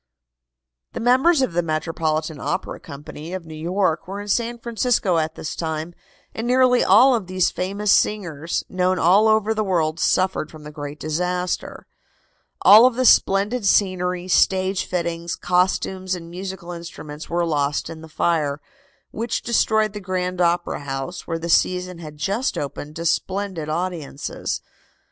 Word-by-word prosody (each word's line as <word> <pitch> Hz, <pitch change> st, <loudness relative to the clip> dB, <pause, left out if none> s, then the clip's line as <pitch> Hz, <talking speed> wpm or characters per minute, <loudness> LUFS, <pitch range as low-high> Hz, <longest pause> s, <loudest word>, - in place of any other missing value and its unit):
The -, -, -4 dB
members 265 Hz, +6 st, +4 dB
of 220 Hz, -, -1 dB
the 175 Hz, -, +2 dB
Metropolitan 155 Hz, -1 st, -2 dB
Opera 185 Hz, -, -3 dB
Company, 150 Hz, +2 st, -9 dB
of 185 Hz, -3 st, -6 dB
New 160 Hz, -, -10 dB
York, 170 Hz, +2 st, -1 dB
were 195 Hz, +2 st, -5 dB
in 205 Hz, 0 st, -7 dB
San 235 Hz, +3 st, 0 dB
Francisco 230 Hz, -6 st, +1 dB
at 160 Hz, 0 st, -2 dB
this 155 Hz, -, -5 dB
time, 160 Hz, +1 st, -4 dB, 0.4 s
and 225 Hz, +2 st, -4 dB
nearly 250 Hz, 0 st, +4 dB
all 240 Hz, +8 st, +6 dB
of 220 Hz, -7 st, -1 dB
these 185 Hz, -1 st, +1 dB
famous 200 Hz, +3 st, -1 dB
singers, 170 Hz, -6 st, 0 dB
known 185 Hz, 0 st, 0 dB
all 190 Hz, +6 st, +5 dB
over 220 Hz, 0 st, +3 dB
the 215 Hz, 0 st, -1 dB
world, 165 Hz, -5 st, 0 dB
suffered 185 Hz, -2 st, +1 dB
from 155 Hz, -1 st, -13 dB
the 150 Hz, -, -9 dB
great 145 Hz, -1 st, -7 dB
disaster. 180 Hz, +3 st, -2 dB, 0.8 s
All 220 Hz, +5 st, +9 dB
of 255 Hz, -, -1 dB
the 255 Hz, +1 st, +1 dB
splendid 205 Hz, +3 st, +4 dB
scenery, 185 Hz, -2 st, +1 dB
stage 190 Hz, +1 st, +2 dB
fittings, 170 Hz, -1 st, -3 dB
costumes 185 Hz, +1 st, 0 dB
and 170 Hz, -1 st, -9 dB
musical 185 Hz, -1 st, -6 dB
instruments 165 Hz, -3 st, -8 dB
were 170 Hz, 0 st, 0 dB
lost 145 Hz, -3 st, 0 dB
in 160 Hz, -1 st, -8 dB
the 160 Hz, -, -11 dB
fire, 155 Hz, -3 st, 0 dB, 0.5 s
which 225 Hz, +1 st, -3 dB
destroyed 220 Hz, -2 st, +2 dB
the 210 Hz, -, -5 dB
Grand 180 Hz, -1 st, -2 dB
Opera 175 Hz, 0 st, +1 dB
House, 140 Hz, +5 st, -5 dB
where 165 Hz, -, -2 dB
the 165 Hz, +1 st, -5 dB
season 180 Hz, +1 st, +1 dB
had 155 Hz, -2 st, -9 dB
just 200 Hz, -, -1 dB
opened 145 Hz, +1 st, -5 dB
to 170 Hz, -, -5 dB
splendid 185 Hz, -2 st, -1 dB
audiences. 160 Hz, -4 st, -3 dB
180 Hz, 155 wpm, -22 LUFS, 160-200 Hz, 0.8 s, All